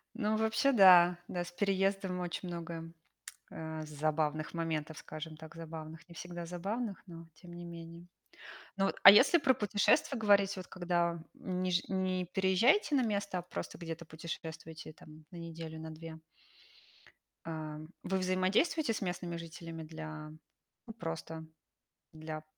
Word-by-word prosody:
Ну, 215 Hz, -3 st, 0 dB
а -, -, +2 dB
вообще, 220 Hz, +5 st, +3 dB
да. 180 Hz, -5 st, +8 dB
Да, 175 Hz, -1 st, -2 dB
с 170 Hz, -, -9 dB
переездами 195 Hz, -1 st, 0 dB
очень 180 Hz, +1 st, -4 dB
много, 165 Hz, -1 st, -6 dB, 0.6 s
э, 160 Hz, -1 st, -5 dB
з -, -, -10 dB
забавных 155 Hz, +1 st, -1 dB
моментов, 160 Hz, -2 st, -2 dB
скажем 155 Hz, 0 st, -7 dB
так, 160 Hz, +1 st, -11 dB
забавных. 165 Hz, +1 st, -8 dB
Не 170 Hz, -, -12 dB
всегда 175 Hz, 0 st, -6 dB
забавных, 200 Hz, +5 st, -3 dB
но 165 Hz, -1 st, -10 dB
тем 175 Hz, +1 st, -13 dB
не 175 Hz, 0 st, -8 dB
менее. 170 Hz, 0 st, -9 dB, 0.7 s
Ну 195 Hz, -, +3 dB
вот, -, -, -1 dB
а 195 Hz, -, +14 dB
если 270 Hz, -, +7 dB
про 265 Hz, -4 st, +4 dB
путешествия 210 Hz, +6 st, +2 dB
говорить, 200 Hz, -2 st, +4 dB
вот 185 Hz, -, -7 dB
когда, 175 Hz, -2 st, 0 dB
м, 185 Hz, -1 st, -3 dB
не 185 Hz, 0 st, 0 dB
жи 180 Hz, -, +3 dB
не 185 Hz, -1 st, 0 dB
переезжаете 190 Hz, -, +3 dB
на 260 Hz, -, +4 dB
место, 200 Hz, -4 st, -1 dB
а -, -, -4 dB
просто 180 Hz, -, -6 dB
где-то 165 Hz, -1 st, -6 dB
путешествуете 160 Hz, 0 st, -7 dB
там 155 Hz, 0 st, -15 dB
на 175 Hz, -, -9 dB
неделю, 165 Hz, -1 st, -7 dB
на 160 Hz, 0 st, -7 dB
2. 160 Hz, 0 st, -9 dB, 1.3 s
А 155 Hz, -2 st, -5 dB, 0.3 s
вы 190 Hz, -, 0 dB
взаимодействуете 190 Hz, -, +2 dB
с -, -, -4 dB
местными 175 Hz, -2 st, -3 dB
жителями 165 Hz, -1 st, -7 dB
для 155 Hz, -1 st, -7 dB, 0.6 s
ну, 225 Hz, -, -7 dB
просто 165 Hz, -4 st, -5 dB, 0.7 s
для 155 Hz, 0 st, -6 dB
175 Hz, 155 wpm, -33 LUFS, 160-190 Hz, 1.3 s, а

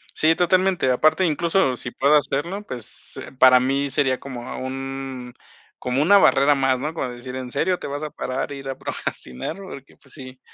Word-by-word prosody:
Sí, 160 Hz, +1 st, +3 dB
totalmente. 180 Hz, -3 st, +2 dB
Aparte, 155 Hz, +8 st, +3 dB
incluso 165 Hz, -3 st, +1 dB
si 120 Hz, -, -5 dB
puedo 140 Hz, +5 st, +3 dB
hacerlo, 160 Hz, +7 st, -1 dB
pues 120 Hz, -4 st, -5 dB, 0.2 s
para 130 Hz, -1 st, +7 dB
mí 135 Hz, +2 st, 0 dB
sería 130 Hz, -1 st, +1 dB
como 125 Hz, -3 st, -8 dB
a -, -, -6 dB
un 135 Hz, -1 st, -6 dB, 0.5 s
como 125 Hz, +3 st, 0 dB
una 200 Hz, +6 st, +6 dB
barrera 140 Hz, -5 st, +4 dB
más, 130 Hz, -1 st, +1 dB
¿no? 150 Hz, +4 st, -3 dB
Como 150 Hz, -5 st, -3 dB
decir: 125 Hz, +1 st, -8 dB
"¿En 130 Hz, -1 st, -6 dB
serio 180 Hz, +1 st, 0 dB
te -, -, -7 dB
vas 145 Hz, +1 st, -5 dB
a 155 Hz, -, -4 dB
parar 130 Hz, -2 st, -4 dB
e 140 Hz, -, -6 dB
ir 135 Hz, 0 st, -8 dB
a 135 Hz, -, -4 dB
procrastinar?" 65 Hz, -, -4 dB
Porque, 185 Hz, -9 st, -11 dB
pues 140 Hz, -, -14 dB
sí, 130 Hz, -2 st, -10 dB
135 Hz, 195 wpm, -22 LUFS, 130-155 Hz, 0.5 s, para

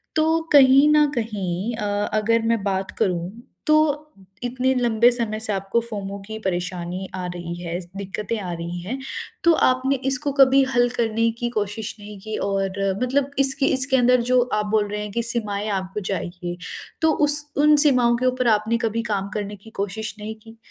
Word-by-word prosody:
तो 320 Hz, +1 st, +3 dB
कहीं 275 Hz, 0 st, +7 dB
न 300 Hz, -1 st, +4 dB
कहीं 210 Hz, -2 st, -3 dB
अ, 210 Hz, -, -3 dB, 0.3 s
अगर 225 Hz, +2 st, +2 dB
मैं 225 Hz, -4 st, -2 dB
बात 190 Hz, -1 st, -2 dB
करूँ 175 Hz, -1 st, 0 dB, 0.4 s
तो 305 Hz, -, +5 dB, 0.7 s
इतने 255 Hz, +2 st, 0 dB
लंबे 240 Hz, -1 st, +4 dB
समय 230 Hz, -3 st, -3 dB
से 220 Hz, -1 st, -2 dB
आपको 195 Hz, +3 st, 0 dB
फोमो 200 Hz, -4 st, -6 dB
की 220 Hz, +1 st, -6 dB
परेशानी 180 Hz, -1 st, -3 dB
आ 185 Hz, -1 st, -4 dB
रही 175 Hz, -1 st, -6 dB
है, 170 Hz, 0 st, -3 dB
इस 180 Hz, -1 st, -9 dB
दिक्क़तें 200 Hz, +3 st, -4 dB
आ 185 Hz, -3 st, -5 dB
रही 170 Hz, +1 st, -5 dB
हैं। 230 Hz, +10 st, -5 dB, 0.4 s
तो 340 Hz, -, +6 dB
आपने 255 Hz, +2 st, +1 dB
इसको 270 Hz, +2 st, 0 dB
कभी 270 Hz, 0 st, +6 dB
हल 245 Hz, 0 st, +4 dB
करने 230 Hz, 0 st, +1 dB
की 240 Hz, -, -1 dB
कोशिश 215 Hz, -1 st, -3 dB
नहीं 205 Hz, 0 st, -10 dB
की? 215 Hz, +2 st, -6 dB
और 195 Hz, -1 st, -2 dB, 0.3 s
मतलब 275 Hz, +2 st, 0 dB
इसके 270 Hz, 0 st, +3 dB
इसके 265 Hz, 0 st, +3 dB
अंदर 250 Hz, 0 st, +4 dB
जो 255 Hz, 0 st, +5 dB
आप 210 Hz, 0 st, +1 dB
बोल 215 Hz, -1 st, +2 dB
रहे 210 Hz, 0 st, -3 dB
हैं 210 Hz, 0 st, -6 dB
की 235 Hz, +3 st, -1 dB
सीमाएँ 215 Hz, -3 st, -1 dB
आपको 190 Hz, +2 st, -6 dB
चाहिए 175 Hz, -2 st, -4 dB, 0.4 s
तो 320 Hz, 0 st, +4 dB
उस 295 Hz, 0 st, +5 dB, 0.2 s
उन 300 Hz, 0 st, +6 dB
सीमाओं 250 Hz, -4 st, +4 dB
के 255 Hz, -, -2 dB
ऊपर 255 Hz, -1 st, +1 dB
आपने 220 Hz, +1 st, +2 dB
कभी 225 Hz, +1 st, -1 dB
काम 200 Hz, -1 st, -1 dB
करने 205 Hz, -1 st, -4 dB
की 205 Hz, +3 st, -15 dB
कोशिश 215 Hz, +3 st, -4 dB
नहीं 215 Hz, +1 st, -6 dB
की? 225 Hz, 0 st, -14 dB
220 Hz, 185 wpm, -22 LUFS, 195-250 Hz, 0.7 s, कहीं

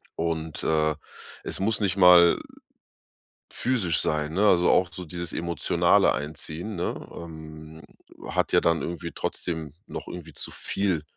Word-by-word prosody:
und, 80 Hz, -1 st, -3 dB
äh, 80 Hz, -1 st, +2 dB, 0.5 s
es -, -, -2 dB
muss 110 Hz, +3 st, +1 dB
nicht 100 Hz, -3 st, 0 dB
mal 90 Hz, -2 st, +7 dB, 1.1 s
physisch 105 Hz, -11 st, 0 dB
sein, 75 Hz, 0 st, -1 dB
ne, 100 Hz, +4 st, +2 dB
also 90 Hz, -3 st, +4 dB
auch 90 Hz, -1 st, +4 dB
so 90 Hz, 0 st, -8 dB
dieses 85 Hz, +1 st, -4 dB
emotionale 85 Hz, 0 st, +2 dB
Einziehen, 80 Hz, +7 st, -5 dB
ne, 85 Hz, -, -4 dB
ähm, 80 Hz, -1 st, -10 dB, 0.5 s
hat -, -, 0 dB
ja -, -, +5 dB
dann 85 Hz, -1 st, +2 dB
irgendwie 85 Hz, 0 st, -5 dB
trotzdem 80 Hz, -4 st, -4 dB
noch -, -, -7 dB
irgendwie 80 Hz, -3 st, -8 dB
zu -, -, -5 dB
viel 95 Hz, -6 st, -1 dB
85 Hz, 140 wpm, -26 LUFS, 80-90 Hz, 1.1 s, mal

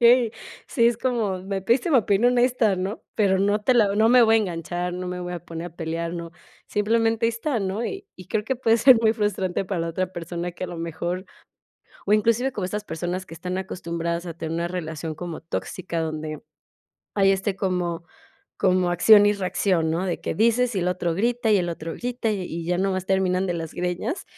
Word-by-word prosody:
Okey, 235 Hz, -1 st, +6 dB, 0.4 s
sí, 235 Hz, -4 st, +3 dB
es 235 Hz, -2 st, +2 dB
como: 230 Hz, -7 st, 0 dB
"Me 195 Hz, 0 st, -3 dB
pediste 245 Hz, -, +2 dB
mi 280 Hz, -, +5 dB
opinión 220 Hz, +2 st, +3 dB
honesta, 240 Hz, -5 st, +3 dB
¿no?, 190 Hz, +4 st, -4 dB
pero 195 Hz, -3 st, +3 dB
no 205 Hz, +2 st, +2 dB
te 255 Hz, -, +4 dB
la 210 Hz, -4 st, +4 dB
no 220 Hz, +1 st, +5 dB
me 250 Hz, 0 st, +7 dB
voy 225 Hz, 0 st, +5 dB
a -, -, +5 dB
enganchar, 175 Hz, -2 st, -3 dB
no 180 Hz, 0 st, -4 dB
me 180 Hz, 0 st, -4 dB
voy 180 Hz, 0 st, -5 dB
a 175 Hz, -, -3 dB
poner 165 Hz, +1 st, -6 dB
a 165 Hz, -, -22 dB
pelear, 165 Hz, 0 st, -3 dB
no. 170 Hz, -1 st, -6 dB, 0.4 s
Simplemente, 225 Hz, +2 st, +1 dB
ahí 230 Hz, -, +2 dB
está, 235 Hz, +2 st, -2 dB
¿no?", 195 Hz, +4 st, -2 dB
y 390 Hz, +7 st, -5 dB
y 185 Hz, -, -12 dB
creo 210 Hz, -1 st, -1 dB
que 265 Hz, -, 0 dB
puede 230 Hz, -2 st, +3 dB
ser 235 Hz, 0 st, +7 dB
muy 220 Hz, -1 st, +4 dB
frustrante 195 Hz, -3 st, -1 dB
para 185 Hz, -2 st, -2 dB
la 165 Hz, -, -2 dB
otra 185 Hz, +2 st, -2 dB
persona 175 Hz, +1 st, -5 dB
que 175 Hz, -, -10 dB
a -, -, -4 dB
lo 175 Hz, -, -7 dB
mejor 170 Hz, +3 st, -3 dB, 0.8 s
o 200 Hz, -, 0 dB
inclusive 230 Hz, +5 st, +2 dB
como 205 Hz, -7 st, -3 dB
estas 210 Hz, +3 st, -3 dB
personas 175 Hz, +2 st, -4 dB
que 165 Hz, -, -11 dB
están 180 Hz, +2 st, -4 dB
acostumbradas 170 Hz, -2 st, -3 dB
a 170 Hz, -, -5 dB
tener 160 Hz, -1 st, -4 dB
una 170 Hz, +1 st, -1 dB
relación 160 Hz, -3 st, -5 dB
como 170 Hz, 0 st, -6 dB
tóxica, 170 Hz, +1 st, -4 dB
donde 155 Hz, -1 st, -4 dB, 0.8 s
hay, 195 Hz, -1 st, +4 dB
este, 195 Hz, 0 st, -1 dB
como 175 Hz, -3 st, -2 dB, 0.5 s
como 185 Hz, -1 st, +2 dB
acción 205 Hz, +4 st, +7 dB
y 205 Hz, -, +4 dB
reacción, 185 Hz, -3 st, 0 dB
¿no?, 175 Hz, +4 st, -1 dB
de 175 Hz, -, -2 dB
que -, -, -2 dB
dices 235 Hz, +2 st, +3 dB
y 185 Hz, -, +1 dB
el 180 Hz, -, 0 dB
otro 180 Hz, -2 st, -1 dB
grita 235 Hz, +4 st, +1 dB
y 205 Hz, -, +5 dB
el 175 Hz, -1 st, -1 dB
otro 165 Hz, -1 st, -5 dB
grita, 245 Hz, -2 st, -2 dB
y 195 Hz, -3 st, -2 dB
y 170 Hz, -1 st, -5 dB
ya 175 Hz, +1 st, 0 dB
nomás 190 Hz, -1 st, 0 dB
terminan 190 Hz, 0 st, +1 dB
de 175 Hz, -, 0 dB
las 165 Hz, -2 st, -5 dB
greñas. 180 Hz, -, -2 dB
190 Hz, 220 wpm, -24 LUFS, 175-220 Hz, 0.8 s, me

